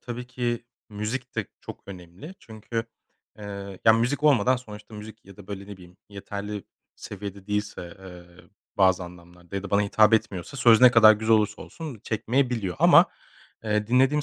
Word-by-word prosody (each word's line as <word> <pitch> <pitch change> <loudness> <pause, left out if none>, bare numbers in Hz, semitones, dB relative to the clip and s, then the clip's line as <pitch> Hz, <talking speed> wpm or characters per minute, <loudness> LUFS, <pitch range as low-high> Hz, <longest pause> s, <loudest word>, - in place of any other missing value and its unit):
tabii 125 0 -7
ki 120 -2 -3 0.2
müzik 110 +5 -5
de 105 - -2
çok - - -10
önemli 95 - -11
çünkü, 115 +1 -6 0.5
eee, 100 -2 -8
ya 110 - +8
müzik 125 +6 0
olmadan 130 -4 +4
sonuçta 105 -3 -12
müzik 110 +1 -11
ya 100 -1 -15
da 100 - -14
böyle 100 -1 -7
ne 100 -1 -9
bileyim 90 -1 -16
yeterli 100 0 -7 0.3
seviyede 100 -1 -9
değilse, 105 -4 -4
eee, 90 -2 -14 0.3
bazı 95 -2 +3
anlamlarda 85 +1 -12
ya 95 - -3
da 100 - -8
bana 100 0 +3
hitap 110 +2 +4
etmiyorsa, 110 +2 -2
söz 115 -4 +5
ne 125 -1 +9
kadar 110 -3 +8
güzel 110 +1 +2
olursa 105 -1 -1
olsun 150 -10 -9
çekmeyebiliyor 115 - -1
ama, - - +7 0.6
eee, 105 -1 0
dinlediğim 135 +5 +3
105 Hz, 165 wpm, -25 LUFS, 100-115 Hz, 0.6 s, ne